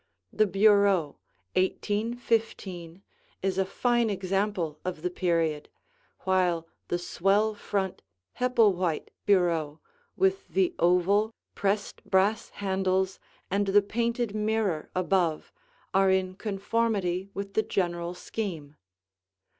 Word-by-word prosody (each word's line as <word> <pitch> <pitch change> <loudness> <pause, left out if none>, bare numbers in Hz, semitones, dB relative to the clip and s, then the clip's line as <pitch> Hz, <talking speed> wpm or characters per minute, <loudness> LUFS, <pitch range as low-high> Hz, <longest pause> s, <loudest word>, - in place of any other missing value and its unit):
The 215 0 +3
bureau, 195 -5 +3 0.4
1815, 205 -3 -1 0.4
is 195 0 0
a 190 - +2
fine 240 +3 +1
example 195 -4 -1
of 180 -3 -4
the 180 - -1
period, 165 -5 0 0.5
while 180 -3 +1 0.2
the 175 - 0
swell 195 +5 +1
front, 195 -2 -3 0.4
Hepplewhite 205 - +2 0.2
bureau 165 -6 +2 0.4
with 385 0 +1
the 370 -2 +1
oval, 195 +5 +3 0.2
pressed 200 +1 -1
brass 200 +3 +2
handles 190 -1 -1 0.3
and 200 +1 +1
the 200 +1 +5
painted 235 +1 -1
mirror 215 -6 0
above 180 -3 0 0.4
are 195 0 +4
in 190 -1 +1
conformity 200 -2 -1
with 200 0 -5
the 220 - +3
general 175 -4 -2
scheme. 170 -7 -5
195 Hz, 105 wpm, -28 LUFS, 180-210 Hz, 0.5 s, the